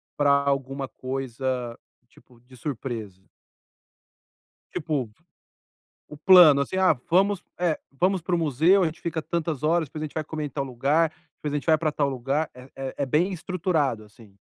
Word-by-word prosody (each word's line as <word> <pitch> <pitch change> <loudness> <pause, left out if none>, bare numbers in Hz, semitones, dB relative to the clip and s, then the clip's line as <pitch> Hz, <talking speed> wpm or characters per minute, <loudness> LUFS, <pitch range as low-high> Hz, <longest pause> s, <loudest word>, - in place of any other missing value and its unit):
para 145 -1 +2
alguma 140 -1 +1
coisa 130 -2 -4 0.3
tipo 120 0 -22
de 130 +1 -18
surpresa? 115 -8 -6 1.5
Tipo, 150 -8 -2 1.0
o 150 - -11
plano 155 -4 +8
assim 140 - -3
ah, 185 -5 +4
vamos, 195 +2 +3 0.2
eh, 170 -4 +1 0.2
vamos 185 0 +2
para 175 +2 0
o - - +1
museu, 165 +5 +3
a - - +3
gente 165 +2 -4
fica 165 -1 -2
tantas 160 -2 -3
horas 160 0 +2
depois 155 +3 -8
a - - -1
gente 150 - -9
vai 155 - -2
comer 155 0 -4
em - - -5
tal 140 0 -3
lugar, 140 +6 +1 0.3
depois 150 -1 -5
a - - 0
gente 145 - -3
vai 160 -2 +4
para 155 -1 0
tal 145 -1 0
lugar, 135 +4 -1
é 125 +1 -13
é 135 -1 -5
é 140 - +1
bem 160 +8 +1
estruturado 160 - -1
assim. 105 -1 -18
145 Hz, 180 wpm, -25 LUFS, 130-165 Hz, 1.5 s, plano